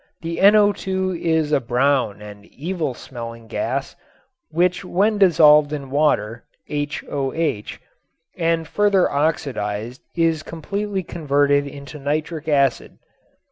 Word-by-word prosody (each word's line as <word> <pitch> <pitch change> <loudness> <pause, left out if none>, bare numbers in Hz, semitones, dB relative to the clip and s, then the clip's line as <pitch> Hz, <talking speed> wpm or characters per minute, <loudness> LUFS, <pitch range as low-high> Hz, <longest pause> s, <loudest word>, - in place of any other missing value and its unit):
The 165 0 -4
NO_ 195 -2 +3
is 160 -2 +1
a 150 - +4
brown 125 -4 0
and 105 -1 -11
evil 160 -3 -4
smelling 115 -2 -9
gas 130 +4 -3 0.5
which 180 +4 +1
when 205 +4 +1
dissolved 150 -5 +6
in 140 -3 -6
water 120 -6 +1 0.2
(HOH) 145 -3 -2 0.7
and 165 -2 0
further 205 -3 +2
oxidized 125 -6 -2 0.2
is 165 -2 +2
completely 195 +5 -4
converted 145 -3 +1
into 140 +2 -9
nitric 155 +3 -3
acid. 140 -4 +1
150 Hz, 105 wpm, -21 LUFS, 135-170 Hz, 0.7 s, dissolved